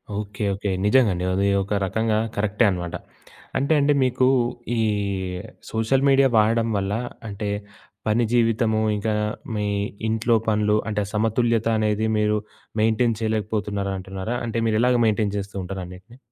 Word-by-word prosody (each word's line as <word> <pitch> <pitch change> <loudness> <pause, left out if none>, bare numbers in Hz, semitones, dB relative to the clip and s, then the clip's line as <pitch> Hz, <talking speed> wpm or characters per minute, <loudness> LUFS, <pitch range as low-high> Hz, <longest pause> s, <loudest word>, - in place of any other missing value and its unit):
Okay. 105 0 -4
Okay. 100 +1 -3 0.2
నిజంగా 110 0 +4
అండి. 90 +1 -3
అది 100 +1 +2 0.2
ఒక 100 +2 -4
రకంగా 110 +3 0 0.2
కరెక్టే 105 +3 +1
అన్నమాట. 90 -3 -3 0.6
అంటే, 140 +4 +2
అండి 145 +1 +3
మీకు 130 0 +2 0.5
ఈ - - +3 0.9
సోషల్ 115 +5 +1
మీడియా 135 0 +5
వాడడం 115 +1 +3
వల్ల 95 0 -1 0.4
అంటే, 100 +1 -4 0.6
పని 115 +3 +3
జీవితము 115 -2 +2
ఇంకా 110 +1 -1 0.4
మీ 105 0 -1 0.4
ఇంట్లో 115 +1 +2
పనులు 105 -1 +2
అంటే, 105 -1 0
సమతుల్యత 115 +1 +1
అనేది 110 0 +1
మీరు 105 0 +2 0.4
మెయింటైన్ 110 0 +2
చేయలేకపోతున్నారా 105 -2 -1
అంటున్నారా? 95 +5 -4
అంటే 115 0 -3
మీరు 110 -1 +2
ఎలాగా 125 -1 +3
మెయింటైన్ 105 -2 +1
చేస్తూంటారు 95 -1 -5
అన్నిటిని. 95 +7 -13
110 Hz, 135 wpm, -23 LUFS, 100-115 Hz, 0.9 s, మీడియా